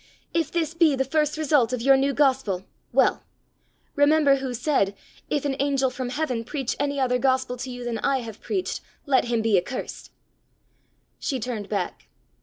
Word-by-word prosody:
If 325 Hz, -3 st, 0 dB
this 330 Hz, -2 st, -1 dB
be 330 Hz, -4 st, +4 dB
the 265 Hz, 0 st, 0 dB
first 300 Hz, +2 st, 0 dB
result 290 Hz, -6 st, +3 dB
of 250 Hz, -2 st, -2 dB
your 270 Hz, +1 st, +6 dB
new 270 Hz, +1 st, +2 dB
gospel 260 Hz, -10 st, +1 dB, 0.3 s
well! -, -, +3 dB, 0.7 s
Remember 290 Hz, -1 st, +5 dB
who 265 Hz, -1 st, -4 dB
said, 230 Hz, -6 st, +1 dB, 0.3 s
'If 290 Hz, -1 st, -1 dB
an 275 Hz, -1 st, 0 dB
angel 275 Hz, -2 st, +1 dB
from 255 Hz, -1 st, -4 dB
heaven 255 Hz, -4 st, -2 dB
preach 270 Hz, +1 st, -3 dB
any 285 Hz, 0 st, 0 dB
other 250 Hz, -1 st, +2 dB
gospel 260 Hz, -1 st, +1 dB
to 260 Hz, +2 st, -5 dB
you 245 Hz, -1 st, -6 dB
than 235 Hz, -2 st, -3 dB
I 270 Hz, +1 st, +1 dB
have 225 Hz, -3 st, -9 dB
preached, 375 Hz, -2 st, -2 dB, 0.2 s
let 265 Hz, -3 st, +3 dB
him 235 Hz, -2 st, 0 dB
be 215 Hz, -4 st, +4 dB
accursed!'" 245 Hz, +9 st, -6 dB, 1.1 s
She 270 Hz, -5 st, -2 dB
turned 220 Hz, -4 st, -4 dB
back. 200 Hz, -4 st, -3 dB
265 Hz, 175 wpm, -25 LUFS, 245-285 Hz, 1.1 s, your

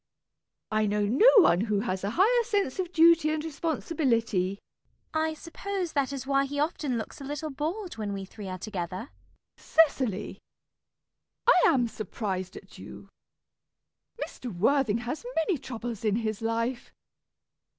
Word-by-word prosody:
I 215 Hz, 0 st, +2 dB
know 205 Hz, 0 st, +1 dB
no 265 Hz, -, +6 dB
one 185 Hz, -, +6 dB
who 210 Hz, -2 st, 0 dB
has 190 Hz, -4 st, -3 dB
a 200 Hz, +2 st, -2 dB
higher 470 Hz, +6 st, +4 dB
sense 405 Hz, -, -1 dB
of 360 Hz, -2 st, -2 dB
duty 335 Hz, -2 st, +5 dB
and 310 Hz, 0 st, -1 dB
responsibility. 260 Hz, -, 0 dB, 0.6 s
CECILY. 315 Hz, 0 st, +1 dB
I 315 Hz, -, -3 dB
suppose 360 Hz, +2 st, -4 dB
that 280 Hz, -2 st, +1 dB
is 270 Hz, -2 st, -5 dB
why 275 Hz, 0 st, +2 dB
he 285 Hz, +1 st, -4 dB
often 295 Hz, -4 st, -1 dB
looks 225 Hz, +5 st, -6 dB
a -, -, -6 dB
little 295 Hz, +2 st, -4 dB
bored 335 Hz, -, -4 dB
when 210 Hz, -2 st, -3 dB
we 195 Hz, -1 st, -4 dB
three 195 Hz, 0 st, -9 dB
are 185 Hz, -, -4 dB
together. 185 Hz, +3 st, -5 dB, 0.5 s
MISS -, -, -19 dB
PRISM. 325 Hz, 0 st, +9 dB, 0.2 s
Cecily! 205 Hz, 0 st, -5 dB, 1.1 s
I -, -, +7 dB
am 255 Hz, -7 st, +3 dB
surprised 190 Hz, -4 st, -4 dB
at -, -, -13 dB
you. -, -, -11 dB, 1.2 s
Mr. 245 Hz, -, -8 dB
Worthing 225 Hz, +4 st, +2 dB
has 275 Hz, -, -4 dB
many 325 Hz, -1 st, +1 dB
troubles 240 Hz, -4 st, -6 dB
in 210 Hz, -2 st, +2 dB
his 220 Hz, -2 st, -2 dB
life. 230 Hz, +2 st, -2 dB
255 Hz, 155 wpm, -28 LUFS, 210-315 Hz, 1.2 s, PRISM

